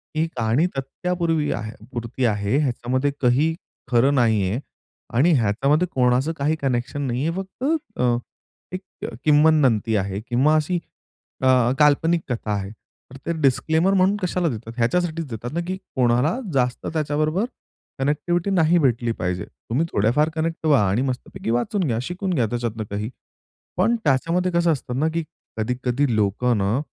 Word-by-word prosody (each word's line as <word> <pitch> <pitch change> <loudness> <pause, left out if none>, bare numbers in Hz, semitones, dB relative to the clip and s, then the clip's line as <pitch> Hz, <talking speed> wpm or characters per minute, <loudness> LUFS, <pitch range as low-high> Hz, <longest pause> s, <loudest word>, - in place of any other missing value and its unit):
ही 155 +1 +2
कहाणी 115 +8 +2
तथ्यापूर्वी 165 +2 -1
आहे 110 -1 -3 0.2
पुरती 120 0 -3
आहे, 105 +2 +1
ह्याच्यामध्ये 130 0 0
काही 135 +6 +3 0.4
खरं 125 +4 +4
नाहीये 110 -3 +2 0.5
आणि 140 +9 +4
ह्याच्यामध्ये 135 - +2
कोणाचं 125 +5 +2
काही 145 +3 +1
कनेक्शन 130 +2 -1
नाहीये. 130 +6 -1
फक्त 190 +5 -7 0.4
अ, 120 -1 +3 0.6
एक 185 - -4 0.4
किम्वदंती 145 -8 +4
आहे 95 0 -2
किंवा 135 +6 +3
अशी 155 +3 +1 0.6
अ, 130 - +2 0.3
काल्पनिक 160 +3 +4
कथा 115 -3 -2
आहे. 100 -1 -3 0.4
तर 135 - -10
ते - - -1
डिस्क्लेमर 160 +7 +2
म्हणून 190 +1 +3
कशाला 180 -1 0
देतात, 115 -1 -6
ह्याच्यासाठीच 165 +7 0
देतात 120 +2 -6
ना, 170 - -1
की 185 - -2 0.2
कोणाला 125 - +2
जास्त 125 -2 0
त्याच्याबरोबर 155 +5 0 0.5
कनेक्टिव्हिटी 170 +7 0
नाही 175 -2 +4
भेटली 120 -5 +1
पाहिजे. 90 0 -2
तुम्ही 135 +9 -3
थोड्याफार 120 +10 +2
कनेक्ट 165 0 -2
व्हा 135 -10 +4
आणि 100 +6 +1
मस्तपैकी 130 -3 -4
वाचून 120 - 0
घ्या, 115 -2 0
शिकून 180 +6 -3
घ्या, 125 -7 +2
त्याच्यातून 115 -2 -3
काही. 105 +3 -3 0.7
पण 220 +6 +3
त्याच्यामध्ये 165 +6 +1
कसं 170 -1 +3
असतं 130 -3 -3
ना, 155 - +2
की 165 -1 -1 0.3
कधी-कधी 125 +3 0
लोक 105 +2 0
ना, 100 +4 +1
135 Hz, 145 wpm, -23 LUFS, 120-160 Hz, 0.7 s, खरं